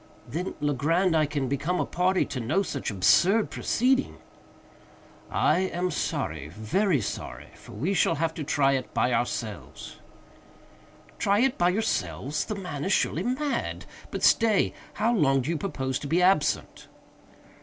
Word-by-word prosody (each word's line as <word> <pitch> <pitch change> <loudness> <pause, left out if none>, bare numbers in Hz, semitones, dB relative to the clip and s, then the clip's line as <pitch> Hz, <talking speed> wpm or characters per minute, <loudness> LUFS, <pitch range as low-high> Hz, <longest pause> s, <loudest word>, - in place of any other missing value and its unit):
"Then, 180 +4 -4
Legrand, 160 +5 +1
I 155 -2 +3
can 145 -2 -2
become 150 +7 -1
a - - +1
party 185 +2 +1
to 130 - -5
no 125 - +1
such 140 -7 -4
absurd 120 - +3
proceeding." 260 +3 +1 1.1
"I - - +2
am 180 -1 -1
sorry—very 120 - -1
sorry—for - - -7
we 155 - -1
shall 165 -2 +2
have 160 +1 -1
to 155 - -5
try 140 -1 +2
it 130 -2 -3
by 125 - +2
ourselves." 115 -4 -4 1.2
"Try 200 +2 +2
it 265 0 +2
by 175 0 +4
yourselves! 150 - -1
The 215 - -4
man 180 -8 -5
is 190 - -1
surely 170 - +1
mad!—but 260 +6 -4
stay!—how 225 +1 +2
long 135 - +3
do 140 +6 -2
you 170 - -1
propose 130 -8 -2
to 145 - -6
be 165 +5 +2
absent?" 180 -5 +1
165 Hz, 140 wpm, -26 LUFS, 135-195 Hz, 1.2 s, by